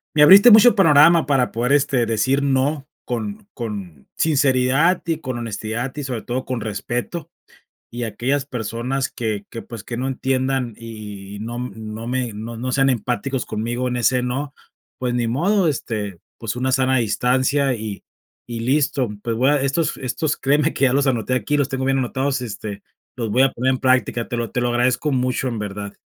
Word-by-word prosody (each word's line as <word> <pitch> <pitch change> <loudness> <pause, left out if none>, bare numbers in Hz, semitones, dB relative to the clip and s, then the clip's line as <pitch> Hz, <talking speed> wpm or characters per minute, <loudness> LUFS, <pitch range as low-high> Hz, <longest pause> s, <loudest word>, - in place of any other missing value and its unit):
me 150 - +6
abriste 200 +9 +9
mucho 220 +3 +8
panorama 165 -3 +6
para 135 -4 +1
poder, 120 +4 0
este, 140 -4 +2
decir 120 +5 +1
no 140 +1 0 0.2
con 205 - -5
con 100 - -7
sinceridad 140 +3 +3
y 165 -1 0
con 130 -5 -4
honestidad 115 +3 -4
y, 145 - -3
sobre 125 -4 -4
todo, 125 +3 -3
con 125 -4 -3
respeto. 125 - -4 0.6
Y 120 0 -4
aquellas 135 +5 -1
personas 125 +2 -3
que 110 -4 -3
que, 115 - -6
pues, 115 -4 -9
que 120 - -6
no 130 +2 -2
entiendan 130 -1 -1
y 105 -3 -9
y - - -7
y - - -8
no 120 +3 -5
no 110 -1 -6
me 125 -2 -2
no 110 +3 -7
no 130 +3 -3
sean 135 +1 +3
empáticos 125 +2 -1
conmigo 120 +4 -2
en 125 - -2
ese 125 +1 +2
no, 135 +3 -3 0.4
pues 125 -1 -2
ni 120 -1 0
modo, 175 - +2
este, 105 - -3 0.2
pues 115 -1 -4
una 130 +1 -1
sana 130 0 +2
distancia 130 +4 +1
y 110 -3 -6 0.4
y 120 -1 -5
listo. 135 -1 +1
Pues, 115 -1 -1
voy 130 +3 +3
a 145 -2 +2
estos 140 +4 0
estos, 145 +4 -2
créeme 145 +3 +2
que 140 - +2
ya 130 - +2
los 140 +1 +2
anoté 130 -1 0
aquí, 130 +4 0
los 140 -1 +1
tengo 135 -1 -2
bien 135 0 +2
anotados, 130 +1 -1
este, 105 -3 -6 0.3
los 115 -4 -3
voy 125 +6 +3
a 135 - +3
poner 130 +2 0
en - - -1
práctica. 130 -2 +1
Te - - -4
lo 115 -1 -2
te - - -1
lo 120 - +1
agradezco 125 +5 +1
mucho, 130 0 0
en 115 -3 -3
verdad. 100 0 -5
125 Hz, 195 wpm, -21 LUFS, 115-135 Hz, 0.6 s, abriste